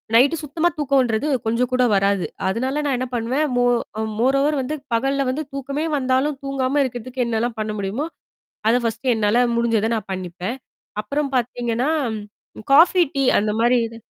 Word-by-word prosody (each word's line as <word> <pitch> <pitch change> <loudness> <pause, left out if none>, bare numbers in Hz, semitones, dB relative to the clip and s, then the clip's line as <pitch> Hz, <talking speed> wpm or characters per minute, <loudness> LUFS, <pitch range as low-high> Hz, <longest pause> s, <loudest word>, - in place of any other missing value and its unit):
Night 280 +7 +4
சுத்தமா 315 +4 0
தூக்கம்ன்றது 265 -3 +1 0.2
கொஞ்சம் 240 +3 0
கூட 255 0 +3
வராது. 195 -1 +2 0.2
அதனால 260 +8 -1
நான் 270 -3 +1
என்ன 255 - -2
பண்ணுவேன். 250 +6 0
மோ 245 - +3 0.6
மோர் 265 +3 +3
ஓவர் 295 -1 +1
வந்து 300 +4 -3 0.2
பகல்ல 270 +2 0
வந்து 305 +4 -3
தூக்கமே 275 +3 -3
வந்தாலும் 265 +2 0
தூங்காம 275 +1 0
இருக்கிறதுக்கு 250 +1 -4
என்னலாம் 230 +1 -1
பண்ண 215 0 -2
முடியுமோ? 205 +10 -2 0.6
அத 230 - +4
ஃபர்ஸ்ட்ட் 230 +3 0
என்னால 220 +3 +3
முடிஞ்சத 230 -2 +1
நான் 215 -3 -6
பண்ணிப்பேன். 185 +5 -4 0.5
அப்புறம் 280 +5 -2
பார்த்தீங்கன்னா 245 +2 -1 0.8
காஃபி, 350 +3 +6
டீ 275 - +1 0.2
அந்த 210 +1 0
மாரி 240 +2 +4
இது 230 0 -10
255 Hz, 155 wpm, -21 LUFS, 230-275 Hz, 0.8 s, காஃபி